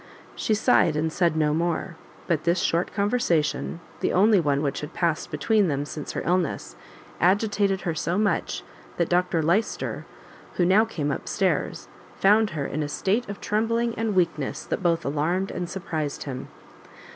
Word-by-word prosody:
She 220 - +1
sighed, 210 - +3
and 155 +1 -1
said 170 -3 +2
no 150 -1 +2
more; 170 +2 -1 0.3
but 165 -4 0
this 170 +1 +2
short 170 0 0
conversation, 195 -7 0 0.2
the - - 0
only 205 +2 +5
one 145 -3 +1
which 140 -1 -1
had 150 +3 -8
passed 165 -3 0
between 195 +7 +2
them 145 -2 -1
since 150 0 -6
her - - -3
illness, 180 -2 -1 0.4
agitated 200 +1 +2
her 170 - -1
so 170 +3 -1
much, 205 -1 0 0.3
that 170 - +1
Dr 175 -2 +2
Lyster, 185 +8 0 0.5
who 175 - +2
now 200 +5 +5
came 150 -10 -2
up - - -4
stairs, - - -1 0.3
found 210 +2 +4
her 140 - -1
in 155 - -3
a 145 - -2
state 200 +9 0
of 200 - -6
trembling 230 +2 0
and 225 -3 -2
weakness 165 -6 0
that - - -3
both 170 -2 +1
alarmed 165 +7 0
and 175 -1 -4
surprised 155 -6 -3
him. 130 -2 -6
175 Hz, 170 wpm, -25 LUFS, 155-200 Hz, 0.5 s, only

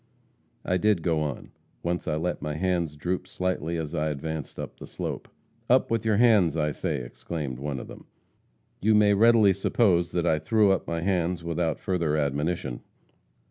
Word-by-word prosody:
"I 90 - +1
did 105 -4 +2
go 80 -3 +1
on. 75 -3 -4 0.3
Once 85 +1 -2
I 75 - 0
let 85 +3 -2
my 75 -1 -3
hands 85 -3 -1
droop 90 +5 -3
slightly, 85 -2 -2
as 80 -2 -4
I 75 +1 0
advanced 75 0 -5
up - - -7
the - - -9
slope. - - -5 0.4
"'Up 130 0 +3
with 115 -1 0
your 110 -2 +3
hands, 105 -9 +4
I 75 -1 +1
say!' 75 -4 -3
exclaimed 65 +2 -5
one 70 -1 -3
of - - -8
them. - - -12 0.7
"You 110 +2 +4
may 105 -1 +5
readily 110 -1 +5
suppose 95 -3 +2
that 85 -1 0
I 80 -2 +2
threw 105 +6 +3
up 95 - 0
my 85 0 -2
hands 90 -2 0
without 85 -1 -1
further 85 -5 0
admonition. 75 -1 -1
85 Hz, 180 wpm, -26 LUFS, 75-95 Hz, 0.7 s, may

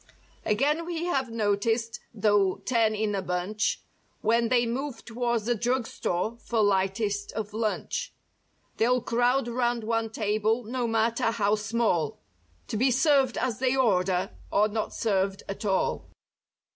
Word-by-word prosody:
Again 285 +10 +1
we 340 -1 -3
have 270 -8 0
noticed, 225 +1 0
though 205 -3 +2
ten 225 -3 +2
in 210 0 -1
a 195 - -1
bunch 185 +4 -1 0.4
When 230 +1 +2
they 240 -1 +3
move 260 +3 -4
towards 235 -2 -1
the 240 - +2
drug 240 +2 0
store 215 +3 -2
for 230 -2 0
lightest 200 +1 0
of 210 -1 -4
lunch. 225 - -2 0.7
They'll 245 +2 +3
crowd 245 +2 +2
'round 240 -1 0
one 225 0 0
table, 215 +2 0
no 240 +2 -2
matter 225 +1 +1
how 210 -3 +1
small. 210 -7 0 0.5
To - - -2
be 255 +5 +3
served 270 0 +3
as 240 -5 -1
they 260 0 +2
order, 190 -6 +2 0.2
or 210 +1 +4
not 215 0 -3
served 195 -3 0
at 200 +2 -5
all. 190 -2 0
225 Hz, 145 wpm, -27 LUFS, 205-245 Hz, 0.7 s, or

